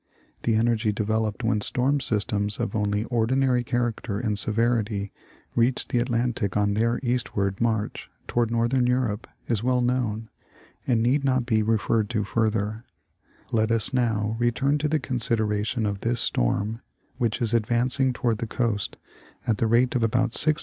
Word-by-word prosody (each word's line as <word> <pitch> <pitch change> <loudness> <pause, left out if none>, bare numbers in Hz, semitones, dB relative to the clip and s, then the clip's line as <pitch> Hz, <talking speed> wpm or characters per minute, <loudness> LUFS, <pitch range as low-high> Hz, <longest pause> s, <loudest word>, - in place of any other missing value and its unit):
The 115 - +1
energy 110 -1 +2
developed 110 +2 -1
when 110 -2 +1
storm 135 +6 +1
systems 105 -3 0
of 120 0 -2
only 105 0 0
ordinary 125 +2 +1
character 120 -4 -2
and 110 -3 -1
severity 110 -1 0 0.4
reach 120 +2 +1
the 120 - 0
Atlantic 120 -4 0
on 105 0 +2
their 115 +3 +1
eastward 115 -6 -1
march 110 -2 -1 0.2
toward 120 -2 +1
northern 120 +2 +1
Europe 125 -4 0 0.2
is 115 -4 0
well 125 0 +2
known, 120 -3 -1 0.6
and 115 -3 +2
need 135 +4 +2
not 130 -2 +1
be 110 -3 +2
referred 110 0 +1
to 110 -3 0
further: 110 +1 -1 0.7
let 110 -1 +2
us 115 +3 +2
now 110 -4 0
return 135 +5 +1
to 150 - 0
the 155 +1 +1
consid 125 -4 -1
eration 110 +1 -1
of 100 -1 -3
this 115 +3 -1
storm 105 - 0 0.4
which 115 -3 0
is 115 -2 -1
advancing 120 +4 +2
toward 120 -3 -1
the 115 - -3
coast 115 -4 -2 0.5
at 110 -3 0
the 115 - +2
48 - - -2
National 120 +3 +4
Geographic 115 0 0 0.2
Magazine. 155 0 +5
115 Hz, 160 wpm, -25 LUFS, 105-125 Hz, 0.7 s, Magazine